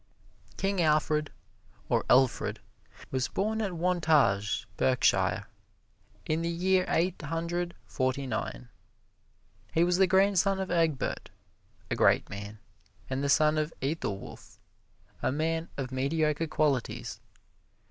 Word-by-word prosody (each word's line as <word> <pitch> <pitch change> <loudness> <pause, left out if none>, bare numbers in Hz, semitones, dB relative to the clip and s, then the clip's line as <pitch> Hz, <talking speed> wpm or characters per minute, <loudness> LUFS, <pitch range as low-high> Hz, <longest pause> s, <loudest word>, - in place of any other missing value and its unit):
King 195 -1 0
Alfred, 150 -1 +2 0.6
or - - +1
Elfred, 130 0 +3 0.5
was 130 -1 0
born 220 +3 -1
at 200 -4 -2
Wantage, 155 - +2
Berkshire, 130 -1 +2 0.8
in 155 +1 0
the 170 - -1
year 185 +2 +2
Eight 175 +2 0
Hundred 170 +3 -3
Forty 130 +1 -1
nine. - - -4 1.0
He 165 - +4
was 175 0 +2
the 190 - +6
grandson 195 0 +3
of 190 -1 -3
Egbert, 165 -5 0 0.6
a - - +1
great - - +3
man, 100 +2 -7 0.5
and 130 +1 -1
the 140 - 0
son 155 +1 +4
of 155 +1 -1
Ethelwulf, 135 - -5 0.6
a - - +1
man 160 +3 -1
of 135 -2 -4
mediocre 150 +4 0
qualities. 145 -5 -1
155 Hz, 115 wpm, -29 LUFS, 135-175 Hz, 1.0 s, the